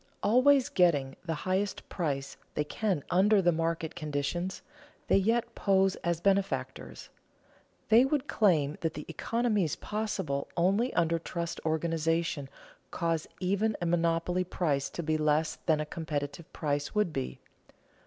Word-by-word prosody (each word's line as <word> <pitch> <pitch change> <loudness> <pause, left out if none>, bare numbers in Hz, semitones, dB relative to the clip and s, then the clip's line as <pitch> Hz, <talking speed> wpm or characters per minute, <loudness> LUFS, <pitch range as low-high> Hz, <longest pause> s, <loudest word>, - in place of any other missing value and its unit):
Always 255 +4 +5
getting 145 -7 +2
the 165 -3 -2
highest 190 +2 -1
price 140 -6 -3 0.2
they 150 - +1
can 180 -1 -1
under 200 +3 +5
the 175 -2 +4
market 165 -1 -1
conditions, 155 +3 -3 0.5
they - - +5
yet 230 +4 +1
pose 195 -3 +2
as 170 -1 -1
benefactors. 195 +1 -1 0.8
They 230 +3 +7
would 285 +1 0
claim 155 -9 +2
that 165 -1 -1
the 150 - -6
economies 210 0 0
possible 190 -10 -3
only 200 +9 +2
under 165 -1 +2
trust 170 0 -4
organization 160 -2 0 0.4
cause 165 -2 -1
even 200 +4 0
a 175 - -2
monopoly 170 +1 +1
price 150 -6 -1
to 170 - -5
be 155 0 +1
less 155 +1 +1
than 155 -2 +3
a 150 - -1
competitive 150 0 -5
price 145 +3 -2
would 210 -6 +1
be. 65 -1 -4
170 Hz, 135 wpm, -30 LUFS, 155-195 Hz, 0.8 s, They